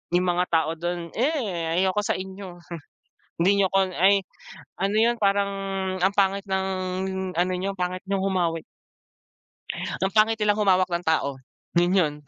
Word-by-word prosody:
yung 180 - +3
mga 180 +1 +1
tao 160 -1 +2
dun, 175 0 -3
eh, 210 - -1
ayoko 190 +2 +2
sa - - 0
inyo. 190 -1 -8 0.9
Hindi 180 +3 +4
niyo 195 - +4
ko 195 0 +4
ay 195 +3 +5 0.6
ano 195 +1 +1
'yun 235 +2 +4
parang 200 0 +2 0.5
ang 190 +2 +3
pangit 195 0 +2
ng 190 0 0 0.7
ano 180 +1 +2
niyo, 195 +2 -2
pangit 180 0 -2
niyong 195 -1 0
humawi. 175 -4 0 1.4
Ang 190 - +1
pangit 220 +1 +4
nilang 210 -1 +1
humawak 185 -2 +3
ng 175 +1 -2
tao, 150 -3 +1 0.4
yun 175 +1 +3
'yon. 155 -5 +2
190 Hz, 150 wpm, -25 LUFS, 175-200 Hz, 1.4 s, ay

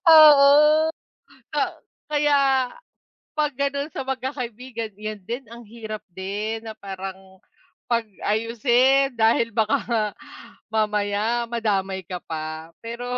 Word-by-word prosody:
Oo. 300 0 +8 0.7
A - - +2 0.5
kaya 295 -1 +2 1.0
'pag 300 -1 0
ganun 280 +1 -1
sa 270 - -4
magkakaibigan 250 -4 -4
'yan 215 -1 -6
din 240 +5 -5
ang 235 0 -11
hirap 215 -1 -7
din 210 +4 -4
na 220 -1 -7
parang 190 -1 -8 0.5
pag-ayusin, 235 +5 +2
dahil 230 0 +2
baka 220 -1 +2
nga 230 -3 +1 0.7
mamaya 215 +2 0
madamay 195 -5 -1
ka 180 - -5
pa 160 0 -6
pero 235 +1 -6
230 Hz, 105 wpm, -23 LUFS, 210-265 Hz, 1.0 s, Oo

